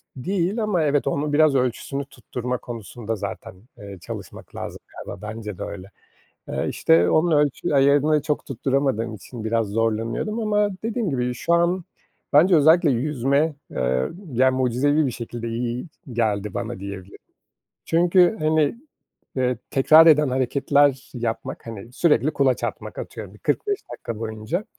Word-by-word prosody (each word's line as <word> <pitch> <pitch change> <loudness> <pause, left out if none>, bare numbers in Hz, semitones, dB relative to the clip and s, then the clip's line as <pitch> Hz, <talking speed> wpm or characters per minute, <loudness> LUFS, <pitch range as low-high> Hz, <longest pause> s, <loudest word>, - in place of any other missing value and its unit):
değil 190 - -1
ama 185 -7 +1
evet, 145 -1 +1
onun 145 +2 -1
biraz 155 -1 +4
ölçüsünü 130 +2 -1
tutturma 125 -1 -5
konusunda 115 -1 -6
zaten, 95 - -6 0.2
eee, 100 -3 -9
çalışmak - - -9
lazım - - -6 0.3
galiba, - - -8
bence 105 -3 -6
de - - -5
öyle. 100 -2 -7 0.6
Eee, - - -2
işte, 85 +2 +3
onun 165 +2 +3
ölçü 145 -1 +1
ayarını 145 +2 +4
çok 150 -1 -2
tutturamadığım 135 -3 -1
için 110 +2 -9
biraz 115 0 +1
zorlanıyordum 115 - -1
ama 210 -1 +2 0.2
dediğim 225 -5 -1
gibi, 125 -2 -1
şu 170 - -1
an 170 +1 +1 0.5
bence 175 +6 +6
özellikle 160 +2 +5
yüzme, 140 +3 +1 0.2
eee, 65 0 0 0.2
ya, 130 +2 +4
mucizevi 130 +4 +2
bir 130 - -1
şekilde 115 0 -6
iyi 120 +4 -3 0.3
geldi 105 -3 -1
bana 120 -1 -4
diyebilirim. 100 -1 -8 0.7
Çünkü, 175 +4 +4
hani, 155 +3 +2 0.6
eee, 125 -1 +1
tekrar 155 +4 +7
eden 150 -2 +6
hareketler 135 +1 +2
yapmak, 115 -2 -4
hani, 115 +1 -8
sürekli 150 0 +3
kulaç 135 -2 +1
atmak - - -5
Atıyorum, - - -7
bir - - -15
45 410 -2 -1
dakika 115 -2 -6
boyunca 110 - -3
130 Hz, 145 wpm, -23 LUFS, 115-155 Hz, 0.7 s, tekrar